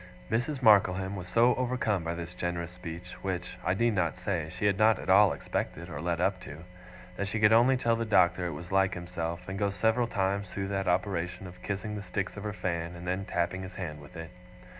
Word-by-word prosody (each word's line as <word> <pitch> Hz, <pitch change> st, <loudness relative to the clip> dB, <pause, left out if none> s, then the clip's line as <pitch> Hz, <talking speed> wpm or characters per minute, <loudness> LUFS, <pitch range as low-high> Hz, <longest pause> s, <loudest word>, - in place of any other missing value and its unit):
Mrs. 130 Hz, +4 st, -1 dB
Markleham 95 Hz, -3 st, +4 dB
was 90 Hz, -2 st, -6 dB
so 115 Hz, +6 st, +4 dB
overcome 120 Hz, -7 st, 0 dB
by 85 Hz, +1 st, -2 dB
this 85 Hz, +1 st, -6 dB
generous 85 Hz, -1 st, -3 dB
speech 90 Hz, 0 st, -8 dB
which, 90 Hz, -2 st, -4 dB
I 90 Hz, -, +1 dB
need 115 Hz, +2 st, +2 dB
not 90 Hz, -3 st, 0 dB
say, 90 Hz, -4 st, -2 dB
she -, -, -1 dB
had 100 Hz, -1 st, +2 dB
not 110 Hz, -1 st, +5 dB
at -, -, -1 dB
all 100 Hz, 0 st, +7 dB
expected 85 Hz, +2 st, -4 dB
or 75 Hz, -1 st, -5 dB
led 85 Hz, -1 st, -1 dB
up 95 Hz, +1 st, +1 dB
to 75 Hz, +3 st, -9 dB, 0.5 s
that 100 Hz, -, -1 dB
she 110 Hz, +3 st, -2 dB
could 105 Hz, +1 st, +6 dB
only 125 Hz, +3 st, +5 dB
tell 115 Hz, -2 st, +2 dB
the 115 Hz, -, -1 dB
Doctor 90 Hz, -4 st, +3 dB
it 85 Hz, -, -4 dB
was 85 Hz, +5 st, -8 dB
like 95 Hz, 0 st, +3 dB
himself, 85 Hz, 0 st, -4 dB
and 95 Hz, +1 st, -4 dB
go 100 Hz, -1 st, +2 dB
several 110 Hz, +5 st, +1 dB
times 100 Hz, -2 st, -1 dB
through 95 Hz, 0 st, -4 dB
that 95 Hz, -1 st, -1 dB
operation 90 Hz, 0 st, -1 dB
of 90 Hz, 0 st, -11 dB
kissing 100 Hz, +2 st, -3 dB
the 105 Hz, -, -4 dB
sticks 95 Hz, +1 st, -3 dB
of 105 Hz, -, -6 dB
her 105 Hz, -, -2 dB
fan, 85 Hz, -3 st, -3 dB
and 85 Hz, +1 st, -9 dB
then 95 Hz, +2 st, -2 dB
tapping 90 Hz, 0 st, -1 dB
his 95 Hz, -1 st, -8 dB
hand 75 Hz, -6 st, -5 dB
with 70 Hz, -, -14 dB
it. 80 Hz, +1 st, -7 dB
95 Hz, 225 wpm, -29 LUFS, 85-105 Hz, 0.5 s, all